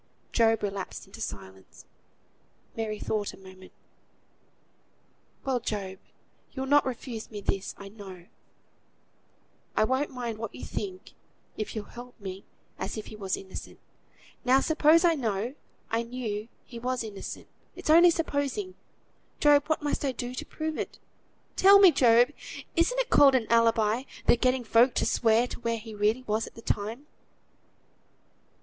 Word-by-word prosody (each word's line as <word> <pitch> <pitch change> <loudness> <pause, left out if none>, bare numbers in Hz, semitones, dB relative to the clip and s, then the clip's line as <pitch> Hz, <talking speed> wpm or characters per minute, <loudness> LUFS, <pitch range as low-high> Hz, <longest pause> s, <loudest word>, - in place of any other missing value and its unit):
Job 225 -2 +3
relapsed 195 -2 -4
into 200 +4 -12
silence. 95 - -8 0.9
Mary 220 -1 -3
thought 210 0 -2
a - - -21
moment. 185 -1 -14 1.7
"Well, 260 -2 +1
Job, 195 -4 -4 0.5
you'll 265 0 -3
not 285 0 +4
refuse 240 -3 -5
me 210 - -6
this, 195 -1 -2
I 200 - -9
know. 195 -4 -11 1.5
I - - +5
won't 260 +5 +1
mind 240 -4 -5
what 230 - -5
you - - -7
think, 375 -2 -6 0.4
if 215 +1 -5
you'll 215 -2 -4
help 245 +2 -12
me 190 -1 -7 0.4
as - - -4
if 215 - -5
he - - -10
was 195 -2 -2
innocent. 190 -1 -9 0.7
Now 255 +2 +5
suppose 315 +3 +4
I 340 - +5
know 230 -4 -2 0.4
I 225 +1 +1
knew 230 -3 -4 0.2
he 235 - -9
was 250 0 -2
innocent, 210 -3 -7 0.3
it's - - -1
only 340 +2 +8
supposing, 330 +3 -1 0.7
Job, 290 -1 +5
what 310 -1 0
must 290 - -1
I 270 -2 0
do 245 0 -5
to 255 - -5
prove 315 -1 -4
it? - - -4 0.6
Tell 395 +1 +8
me, 390 -3 +8
Job! 240 -1 +5 0.4
Isn't 340 +9 +2
it - - -1
called 275 -2 +7
an 245 -3 +2
alibi, 230 +1 +3 0.2
the - - +6
getting 255 +1 +1
folk 235 +2 +4
to - - +1
swear 230 0 +3
to - - -8
where 230 -1 -1
he 220 0 -9
really 215 +4 +1
was 220 -1 -1
at - - -13
the 230 - -10
time?" 220 +7 -2
235 Hz, 155 wpm, -28 LUFS, 210-270 Hz, 1.7 s, only